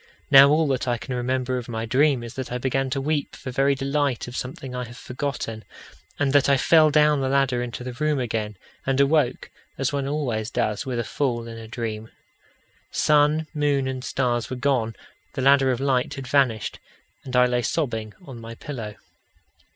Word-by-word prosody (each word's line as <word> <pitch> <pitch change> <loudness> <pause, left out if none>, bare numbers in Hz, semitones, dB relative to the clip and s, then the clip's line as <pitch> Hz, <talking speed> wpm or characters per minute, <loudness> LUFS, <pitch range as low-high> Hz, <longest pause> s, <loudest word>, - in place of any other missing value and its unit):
Now 135 +1 +9
all 155 +2 +3
that 130 -1 -1
I 120 -1 +1
can 125 - -6
remember 130 +1 -1
of 120 - -9
my 115 -1 -3
dream 130 +1 +2
is 115 - -8
that 130 -2 -6
I 125 - -1
began 135 +1 -1
to 135 - -1
weep 145 +1 -2
for 130 - -7
very 135 +2 +2
delight 140 -2 -1
of 125 - -8
something 130 0 -6
I 125 0 -3
have 120 +1 -12
forgotten, 130 -5 -4 0.5
and 140 -1 +1
that 140 -1 +4
I 140 - +5
fell 155 +3 +5
down 150 -1 +4
the 130 - 0
ladder 135 -2 +2
into 120 0 -5
the 125 0 -5
room 150 +3 0
again 110 -4 -3 0.3
and 135 0 0
awoke, 140 -1 +2 0.3
as 135 +1 -1
one 140 -1 -1
always 125 -7 -2
does 110 +3 -1
with 125 -2 -2
a 120 - 0
fall 120 -2 -2
in 115 0 -8
a 110 - -9
dream. 110 -1 -5 0.8
Sun, 150 +1 +3
moon, 145 -3 +1
and 130 -1 -4
stars 120 -3 -1
were 130 - -3
gone; 125 -4 0 0.4
the 130 - -3
ladder 135 0 +5
of 125 -2 0
light 135 -2 0
had 135 - -6
vanished; 125 -7 +1 0.4
and 130 -1 -6
I 125 0 +6
lay 125 0 +1
sobbing 115 -6 -2
on 125 -6 -9
my 115 0 -8
pillow. 115 -7 -7
130 Hz, 195 wpm, -24 LUFS, 120-140 Hz, 0.8 s, Now